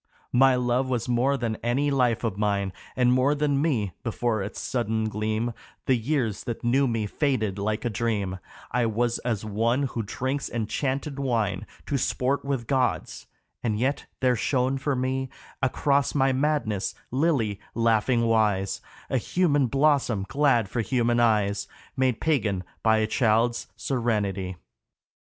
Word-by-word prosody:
My 130 +1 +6
love 125 +1 +1
was 125 -2 -1
more 125 +3 +2
than 115 -3 -2
any 135 +5 0
life 125 -4 +2
of 110 -5 -1
mine 100 -2 0 0.2
And 125 -1 +4
more 130 +3 +3
than 145 -1 +1
me, 120 - 0
before 115 -1 -1
its 100 +2 -5
sudden 110 -3 -1
gleam 110 +2 -1 0.3
The 130 - +3
years 120 -3 -1
that 120 -1 -4
knew 130 +3 +3
me 115 -3 -1
faded 110 -5 -1
like 105 +3 -2
a - - +2
dream, 105 -5 -1 0.3
I 120 -1 +2
was 120 +2 0
as 110 -4 -2
one 115 +6 +1
who 120 -3 -2
drinks 130 +6 -3
enchanted 135 +5 -2
wine 110 -8 -1 0.2
To 140 - -1
sport 125 +6 0
with 135 -4 -2
gods; 130 0 -1 0.3
and 110 -3 0
yet 130 +5 -1
there 125 -1 +3
shone 130 +3 0
for 140 +1 0
me 130 +1 -1 0.3
Across 140 +1 +1
my 135 -1 +3
madness, 130 -9 0 0.2
Lily, 130 -8 +1 0.2
laughingwise, 110 -3 +2 0.3
A 130 - +1
human 145 -2 +2
blossom 135 -7 +2
glad 135 -7 +2
for 115 +5 -2
human 120 0 +1
eyes, 105 -4 +2 0.3
Made 130 -3 +1
pagan 110 -12 0 0.2
by 110 -1 +4
a 110 - +2
child's 115 +1 +1
serenity. 100 -7 -1
120 Hz, 145 wpm, -26 LUFS, 110-135 Hz, 0.3 s, My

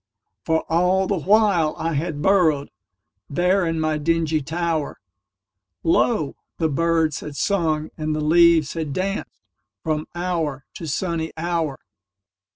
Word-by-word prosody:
For 160 0 +1
all 180 +3 +2
the 190 -1 -1
while 195 -4 +3
I 165 0 -2
had 150 0 -2
burrowedThere 155 - 0
in 165 0 -2
my 155 -1 0
dingy 160 0 +1
tower, 160 0 -2 0.8
Lo! 165 - +2 0.2
the 160 -2 +1
birds 165 0 +1
had 150 -2 -8
sung 160 -4 0
and 155 0 -1
the - - -2
leaves 165 0 +4
had 160 -4 -3
dancedFrom 150 - -5
hour 165 -6 -2
to 165 - -7
sunny 160 +1 -2
hour. 165 -4 -1
160 Hz, 120 wpm, -22 LUFS, 150-175 Hz, 0.8 s, leaves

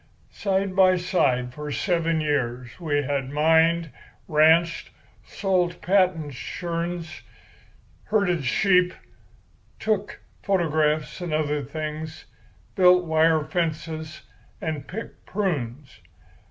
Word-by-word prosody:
Side 195 -1 -1
by 185 -1 +5
side 125 -9 0
for 150 +1 -6
seven 165 -1 0
years 125 -4 -2
we 145 -4 0
had 135 -1 -2
mined, 160 +2 +3 0.4
ranched, 160 +2 +3 0.3
sold 180 -3 -1
patent 180 -6 +1
churns, 170 +4 -5 0.8
herded 200 -7 +1
sheep, 180 - +3 0.8
took 210 -2 -1 0.2
photographs 155 -4 0
and 170 -3 -2
other 150 -1 0
things, 155 +3 -6 0.5
built 180 -1 +5
wire 160 -1 +3
fences, 155 -1 -3 0.4
and 155 -4 -4
picked 220 +9 -8
prunes. 145 - -3
160 Hz, 95 wpm, -24 LUFS, 150-180 Hz, 0.8 s, by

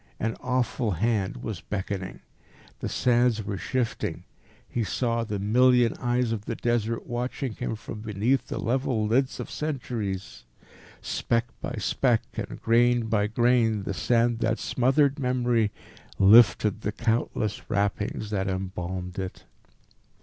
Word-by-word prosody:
An 115 +1 -1
awful 125 -3 0
hand 100 +1 -1
was 110 -6 -4
beckoning. 95 -2 -4 0.6
The - - -3
sands 120 -2 +2
were 100 -1 -4
shifting. 120 +7 -2 0.4
He 120 - -1
saw 115 +4 0
the 105 -2 -3
million 120 +4 +4
eyes 120 -1 +1
of 105 -2 -3
the - - -3
Desert 115 -1 -1
watching 125 +1 -3
him 110 - -3
from 105 0 -8
beneath 110 +5 0
the - - -4
level 125 -2 0
lids 130 +5 +1
of - - -6
centuries. 115 - -4 0.6
Speck 115 0 0 0.2
by - - -4
speck, - - +1
and - - -5
grain 120 0 +3
by 105 -2 +2
grain, 115 -2 +2
the 100 - -3
sand 115 +3 +2
that 115 -1 +1
smothered 135 +3 +2
memory 125 -4 +1 0.5
lifted 105 0 +6
the 105 - -1
countless 110 -1 -1
wrappings 105 0 -1
that 95 -2 -1
embalmed 95 -1 -4
it. 95 -1 -5
115 Hz, 135 wpm, -26 LUFS, 105-120 Hz, 0.6 s, lifted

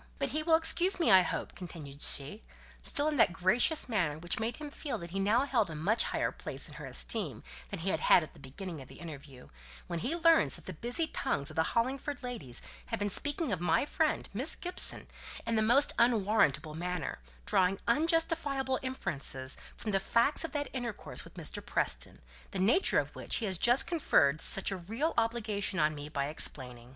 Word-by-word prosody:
"But - - -1
he 310 - -1
will 320 +1 +4
excuse 335 +4 +2
me, 325 -10 +3
I 190 -1 +8
hope," - - -4
continued 150 -6 -10
she, 145 +10 +5 0.4
still 290 +1 +1
in 305 -1 -1
that 225 - +5
gracious 215 - +2
manner 180 - -1
which 175 +5 -3
made 225 +2 -2
him 300 -1 -8
feel 285 -5 -5
that 170 -3 -9
he 195 - -3
now 220 +7 +2
held 230 -9 +1
a 160 - -7
much 200 +10 +1
higher - - -1
place - - -6
in - - -13
her - - -7
esteem - - -1 0.3
than 200 -4 -6
he 190 - -1
had - - -1
had 175 - +5
at 155 - -11
the - - -17
beginning 155 +4 -8
of 130 - -12
their - - -13
interview, 140 -6 -11 0.4
"when 170 - -4
he 265 - -2
learns 330 -1 +3
that - - -8
the - - -6
busy 245 +8 -2
tongues 165 - -2
of - - -12
the 160 - +2 0.2
Hollingford 275 +4 -2
ladies 160 - -5 0.2
have 230 - -3
been 205 -1 -1
speaking 290 - +2
of 180 -4 -2
my 175 - +2
friend, 310 +1 -1
Miss 255 +10 +1
Gibson, 360 0 0 0.4
in 230 0 -1
the 220 - +2
most 245 +6 +4
unwarrantable 210 - +2
manner; 175 - -4 0.3
drawing 190 +1 +1
unjustifiable 295 -2 +1
inferences 140 - 0 0.2
from 215 - -4
the 195 - +2
facts 235 - +2
of 330 - -5
that 290 -1 -2
intercourse 245 -4 -5
with - - -16
Mr. - - -5
Preston, - - -1 0.3
the - - -6
nature 220 - +3
of - - -1
which - - -2
he 230 - -1
has 190 -4 0
just 245 +2 +5
conferred 160 - +2
such 195 - +4
a 195 - -3
real 225 - -3
obligation 220 -4 -1
on 155 -2 +2
me 145 0 -8
by 140 -2 -2
explaining." 125 -5 -2
215 Hz, 205 wpm, -31 LUFS, 165-275 Hz, 0.4 s, I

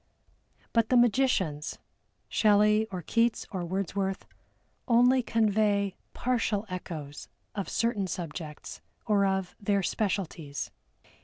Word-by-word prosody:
But 230 -2 +3
the 255 - +5
magicians, 220 - +2 0.5
SHELLEY, 210 0 +4
or 185 -3 -5
KEATS, 230 +4 +1
or 185 -3 -3
WORDSWORTH, 190 +2 -2 0.6
only 250 +2 +5
convey 210 -3 +1 0.2
partial 230 -4 0
echoes 155 -5 -6 0.3
of 200 -2 -4
certain 225 -4 0
subjects, 160 -3 -6 0.2
or 200 -2 +3
of 190 -1 -1
their 200 -1 +1
specialties. 175 -8 -2
200 Hz, 100 wpm, -29 LUFS, 185-225 Hz, 0.6 s, the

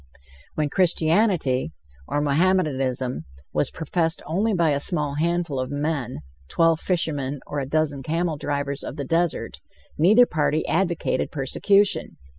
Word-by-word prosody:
When 155 -1 0
Christianity, 165 - +2 0.3
or 145 - -1
Mohammedanism, 140 - 0 0.3
was - - +1
professed 165 +1 -1
only 200 +8 0
by 170 -5 +2
a 140 - +1
small 150 -3 -1
handful 170 -4 0
of 130 0 -2
men 145 - -3 0.3
twelve 165 - +2
fishermen, 145 -7 -1
or 145 - -4
a 135 - -3
dozen 150 -2 0
camel 165 +3 -1
drivers 140 -1 -3
of - - -6
the 140 -3 -4
desert 165 +3 -1 0.4
neither 215 +10 +6
party 155 -4 0
advocated 170 -2 0
persecution. 195 +8 +1
155 Hz, 130 wpm, -24 LUFS, 140-175 Hz, 0.4 s, neither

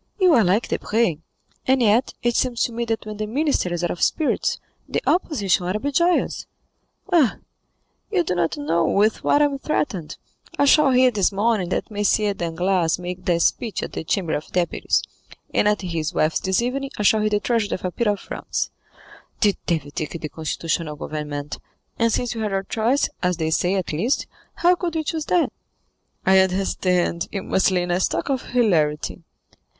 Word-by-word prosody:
"You 365 -3 +5
are 235 - +5
like 195 +5 +2
Debray, 210 -8 0 0.5
and 265 0 +4
yet 235 +2 +2
it 240 -1 +1
seems 245 -2 +1
to - - -1
me 235 +1 -3
that 225 -1 -2
when 215 -1 -6
the 215 0 -3
minister 275 - 0
is 175 0 -2
out 175 - 0
of 175 - -6
spirits, 315 - +1 0.3
the - - 0
opposition 200 - +1
ought 185 - 0
to 210 - -1
be 285 +5 -2
joyous." 340 +5 +1 0.7
"Ah, 305 -9 +4 0.7
you 375 -4 +2
do 245 - -1
not 170 -2 0
know 165 +4 +1
with 210 +6 +2
what 290 - +4
I - - +6
am 280 -1 -2
threatened. 195 - -2 0.4
I 285 - +4
shall 290 0 +5
hear 255 0 +5
this 205 -4 +1
morning 205 -2 +1
that 220 - -2
M. 205 0 +2
Danglars 175 0 0
make 180 +1 -5
a 170 -1 +3
speech 215 +4 0
at - - -6
the - - -4
Chamber 165 0 -1
of 150 - -3
Deputies, 180 -1 0 0.5
and - - +3
at 210 -1 +2
his 165 -4 -3
wife's 155 +1 +2
this 190 +5 0
evening 275 +3 -2
I 210 - -1
shall 215 +1 +4
hear 215 - +2
the 210 -1 +1
tragedy 225 -2 0
of 185 - -7
a 180 - -1
peer 230 +3 0
of 205 - -3
France. - - -4 0.7
The 205 -3 +4
devil 155 -5 -1
take 155 +2 -4
the 155 - -5
constitutional 160 0 -3
government, 150 -1 -5 0.4
and 230 0 +3
since 245 +2 -1
we 225 - -5
had 210 -2 -2
our 195 0 0
choice, 230 +7 +1
as 180 -2 +1
they 160 0 -1
say, 180 +4 +1
at 185 -5 -2
least, 225 - 0 0.3
how 350 +1 +4
could 345 -2 -3
we 320 - 0
choose 310 0 -3
that?" 355 - +1 0.7
"I 190 0 +6
understand; 180 -2 +1
you 195 -2 -4
must 190 - +2
lay 180 -2 +1
in 175 - -3
a 175 - +1
stock 170 +1 -1
of 265 -3 0
hilarity." 170 -10 +1
200 Hz, 195 wpm, -22 LUFS, 175-240 Hz, 0.7 s, I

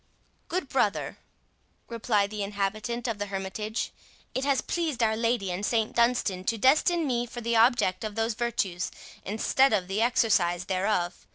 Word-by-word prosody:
"Good 345 -4 -2
brother," 215 -6 0 0.7
replied 215 -3 0
the 210 -1 -4
inhabitant 210 +4 -2
of 225 -3 -3
the 205 - -2
hermitage, 200 +3 -3 0.4
"it 260 - -1
has 280 -2 +2
pleased 315 -8 -1
Our 220 -1 +2
Lady 230 -4 0
and 180 +3 -4
St 220 0 0
Dunstan 235 -6 +1
to 230 - 0
destine 310 - +3
me 245 -3 0
for 240 +1 -7
the 235 0 0
object 225 -5 +3
of 215 -1 -4
those 225 +1 0
virtues, 205 -6 -2 0.3
instead 225 +5 +2
of 190 -4 +1
the 195 +3 -1
exercise 195 -7 +2
thereof. 185 -1 -1
220 Hz, 160 wpm, -27 LUFS, 200-240 Hz, 0.7 s, destine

